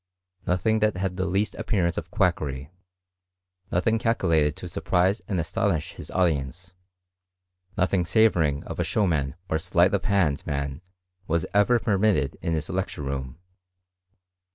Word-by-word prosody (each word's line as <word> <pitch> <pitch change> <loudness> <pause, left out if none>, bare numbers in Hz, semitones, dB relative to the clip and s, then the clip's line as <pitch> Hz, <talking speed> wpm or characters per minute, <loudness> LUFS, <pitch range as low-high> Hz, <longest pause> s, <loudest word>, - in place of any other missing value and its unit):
Nothing 100 +5 +2
that 105 -3 +1
had 95 -1 -2
the 95 0 -1
least 100 +3 0
appearance 85 -5 0
of 80 - -5
quackery; 80 - -1 1.0
nothing 110 +6 +1
calculated 80 -10 +2
to 90 - -7
surprise 95 +3 +1
and 95 -4 -1
astonish 80 - -1
his - - -9
auci3nce; 90 +1 -1 1.0
nothing 95 0 +2
savouring 85 -9 +3
of - - -7
a - - +2
showman 75 -10 0
or 80 -1 0
sleight 90 +2 +2
of 100 -1 +1
hand 90 -8 +1
man 70 0 -3 0.5
was 85 0 0
ever 105 +4 +4
permitted 100 -9 +1
in 85 - -1
his 80 -1 -2
lecture 90 -5 -3
room. 70 -1 -4
90 Hz, 135 wpm, -25 LUFS, 75-100 Hz, 1.0 s, ever